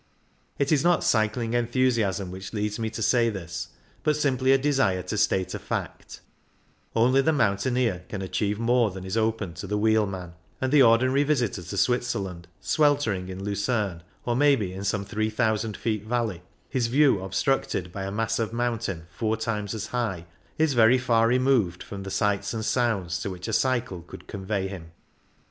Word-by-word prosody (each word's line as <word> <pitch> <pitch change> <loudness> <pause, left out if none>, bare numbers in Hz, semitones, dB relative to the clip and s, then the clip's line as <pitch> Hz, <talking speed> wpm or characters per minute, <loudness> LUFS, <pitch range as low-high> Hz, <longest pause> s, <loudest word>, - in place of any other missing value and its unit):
It 140 +1 0
is 150 -2 +3
not 175 -1 +3
cycling 115 +1 +1
enthusiasm 115 -6 +1
which 95 +2 -8
leads 105 0 -2
me 110 -1 -1
to 110 - -4
say 120 0 +3
this, 85 -5 -5 0.3
but 150 -1 +2
simply 130 -3 +2
a 135 - +6
desire 130 -10 +1
to 90 +4 -4
state 95 -3 +1
a - - -4
fact; - - -5 0.7
only 125 +4 +4
the 160 - +2
mountaineer 115 - +1
can 95 -2 -4
achieve 100 +3 -1
more 115 0 +2
than 95 -1 -8
is 95 - -3
open 110 -5 0
to 85 +4 -7
the 105 +2 -1
wheel 110 0 +3
man, 90 -3 -6 0.3
and 130 0 -1
the 145 -1 +6
ordinary 130 +3 +5
visitor 125 -10 0
to 90 +4 -6
Switzer 120 +3 +1
land, 90 -3 -6
sweltering 115 -7 +1
in 95 +1 -6
Lucerne, 100 -3 -1 0.2
or 120 - 0
maybe 130 -9 +3
in 95 +1 -6
some 100 0 -1
three 110 +1 -1
thousand 110 -2 0
feet 110 -2 -2
valley, 110 -5 -2 0.3
his 125 -3 0
view 135 -3 +4
obstructed 95 -2 -1
by 100 - -6
a 95 - -4
mass 115 +2 -1
of 110 -1 -1
mountain 115 -8 -2
four 110 +5 -1
times 110 -2 -3
as 110 - -4
high, 110 -9 -3 0.3
is 155 -2 +2
very 120 +1 +6
far 115 -3 +3
removed 125 -8 +2
from 100 -1 -7
sights 100 +2 0
and 110 -1 -3
sounds 100 -10 0
to 90 - -3
which 90 -1 -7
a 110 - -3
cycle 120 -6 0
could 85 - -12
convey 95 -1 -3
him. 85 -4 -9
110 Hz, 180 wpm, -26 LUFS, 95-125 Hz, 0.7 s, a